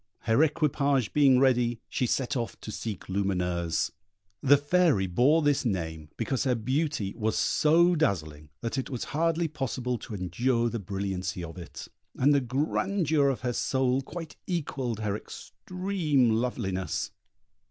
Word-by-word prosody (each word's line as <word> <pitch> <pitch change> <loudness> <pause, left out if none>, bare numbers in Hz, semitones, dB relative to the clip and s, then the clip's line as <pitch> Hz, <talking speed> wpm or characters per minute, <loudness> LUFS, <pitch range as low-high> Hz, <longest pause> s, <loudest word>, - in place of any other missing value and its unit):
Her 115 +5 +2
equipage 140 -6 +1
being 140 -3 +5
ready, 120 -3 +2
she 125 - -1
set 135 +3 0
off 120 -3 -3
to 110 - -6
seek 105 -3 -5
Lumineuse. 90 -4 -1 0.5
The 145 +1 +6
Fairy 145 - +2
bore 130 - +3
this 145 -1 +2
name 80 - -3
because 120 +3 -1
her 130 -3 +2
beauty 130 -2 -1
was 110 -1 -1
so 170 +3 +4
dazzling 80 - -1
that 120 +3 -2
it 130 - -4
was 125 -4 -4
hardly 165 +2 +1
possible 130 -5 -3
to 110 0 -7
endure 115 +6 0
the 115 - -3
brilliancy 95 -2 -3
of 80 -1 -7
it, 85 - -9 0.3
and 145 +3 +4
the 140 - +3
grandeur 150 - +1
of 135 - -2
her 125 -1 -1
soul 130 +1 +1
quite 165 +3 -8
equalled 135 - -2
her 105 -2 -1
extreme 165 - -1
loveliness. 110 -5 -2
125 Hz, 145 wpm, -28 LUFS, 100-145 Hz, 0.5 s, The